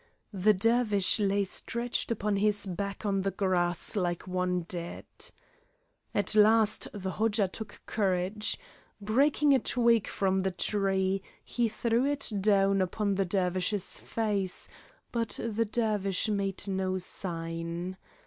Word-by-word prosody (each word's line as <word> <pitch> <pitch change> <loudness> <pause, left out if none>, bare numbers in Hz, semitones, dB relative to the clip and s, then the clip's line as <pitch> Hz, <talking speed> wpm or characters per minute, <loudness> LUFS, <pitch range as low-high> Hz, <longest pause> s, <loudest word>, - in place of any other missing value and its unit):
The 205 +2 +3
Dervish 220 -1 +3
lay 200 0 +2
stretched 235 +5 -2
upon 210 -3 0
his 205 0 +1
back 200 +3 -4
on 195 -1 +1
the 195 - 0
grass 180 -3 0
like 175 -4 -1
one 180 -1 -1
dead. 170 0 -6 1.1
At 205 -2 +2
last 215 0 +4
the 190 -2 -4
Hodja 215 -1 +1
took 215 +4 -8
courage. 200 +1 +1 0.4
Breaking 275 +7 +3
a 265 - +5
twig 235 -4 +2
from 190 -1 0
off 190 - 0
the - - +3
tree, 195 0 0 0.2
he 240 -2 0
threw 230 +2 0
it 285 -2 0
down 195 -1 +3
upon 200 +2 0
the 195 0 +1
Dervish's 185 +1 0
face, 205 -5 -2 0.4
but 230 -3 -1
the 230 0 -1
Dervish 210 -2 0
made 200 -1 -1
no 190 -1 -1
sign. 170 0 -3
200 Hz, 130 wpm, -29 LUFS, 185-220 Hz, 1.1 s, a